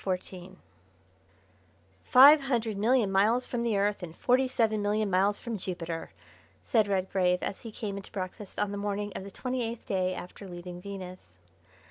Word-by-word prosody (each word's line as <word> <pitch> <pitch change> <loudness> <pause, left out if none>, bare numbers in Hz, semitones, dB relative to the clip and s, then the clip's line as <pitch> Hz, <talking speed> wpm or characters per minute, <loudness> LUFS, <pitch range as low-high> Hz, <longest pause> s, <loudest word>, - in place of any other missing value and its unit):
CHAPTER 185 -2 -1
XIV 185 +1 -11 1.5
"Five 280 +4 +8
hundred 230 -5 0
million 220 0 +2
miles 220 +6 +3
from 240 - -3
the 230 -3 +1
Earth, 205 +1 0
and 165 -2 -8
forty 255 +1 +3
seven 220 -4 +1
million 205 0 0
miles 195 +3 +3
from 230 -4 -5
Jupiter," 170 -3 -5 0.5
said 220 -4 +2
Redgrave 185 -2 +1
as - - -4
he 225 - -8
came 205 -2 -5
into 200 - -9
breakfast 195 0 -6
on 205 -1 0
the 200 - -4
morning 205 0 -3
of - - -5
the 200 - -8
twenty 255 +4 -3
eighth 230 0 -4
day 185 -2 0
after 195 +2 -9
leaving 175 0 -8
Venus. 185 - -9
200 Hz, 170 wpm, -29 LUFS, 185-225 Hz, 1.5 s, Five